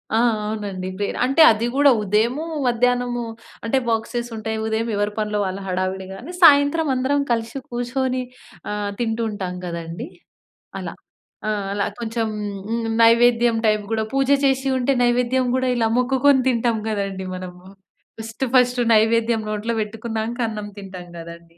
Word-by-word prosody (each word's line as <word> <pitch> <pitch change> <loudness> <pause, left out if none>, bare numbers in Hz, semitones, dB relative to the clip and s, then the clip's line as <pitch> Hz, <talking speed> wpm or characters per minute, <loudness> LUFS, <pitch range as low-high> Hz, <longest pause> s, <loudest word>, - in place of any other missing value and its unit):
ఆ! - - +3 0.3
అవునండి 200 -4 -4
ప్రేయర్. 205 0 -2
అంటే, 270 +5 +3
అది 220 +2 -1
గూడా 285 0 +6
ఉదయమూ, 225 +9 +1 0.2
మధ్యానము. 245 0 +1 0.4
అంటే, 245 +4 +1
బాక్సెస్సుంటాయి. 225 -1 -2
ఉదయం 220 +1 -1
ఎవరు 205 +1 0
పనులో 210 -1 -1
వాళ్ళు 190 +1 -4
హడావుడి 185 +1 -2
గానీ, 260 - -9
సాయంత్రం 290 0 +6
అందరం 275 +3 +1
కలిసి 230 +2 -1
కూర్చొని 255 +1 -1 0.5
ఆహ్, 205 -1 -2
తింటూంటాం 220 -5 -2
కదండీ. 170 - -5 0.7
అలా. - - -5 0.6
ఆహ్, 205 -2 -1
అలా 200 0 0
కొంచం, 225 -1 -2 0.4
హ్మ్. 230 0 -1 0.2
నైవేద్యం 235 0 +5
టైప్ 215 -1 +2
గూడా. 220 -1 0
పూజ 270 0 +1 0.2
చేసి 270 0 +1
ఉంటే, 260 +2 +1
నైవేద్యం 250 +1 +2
గూడా 260 0 +1
ఇలా 225 -1 +2
మొక్కుకొని 265 +2 +3
తింటాం 235 -2 +1
గదండీ 195 -3 -3
మనము. 180 -1 -9 0.6
ఫస్ట్, 225 +3 -5
ఫస్ట్ 250 0 +4 0.2
నైవేద్యం 225 +1 +3
నోట్లో 215 +2 -2
పెట్టుకున్నాంక 225 +2 -4
అన్నం 210 -1 -5
తింటాం 190 -3 -9
గదండీ. 170 0 -12
225 Hz, 135 wpm, -22 LUFS, 205-245 Hz, 0.7 s, గూడా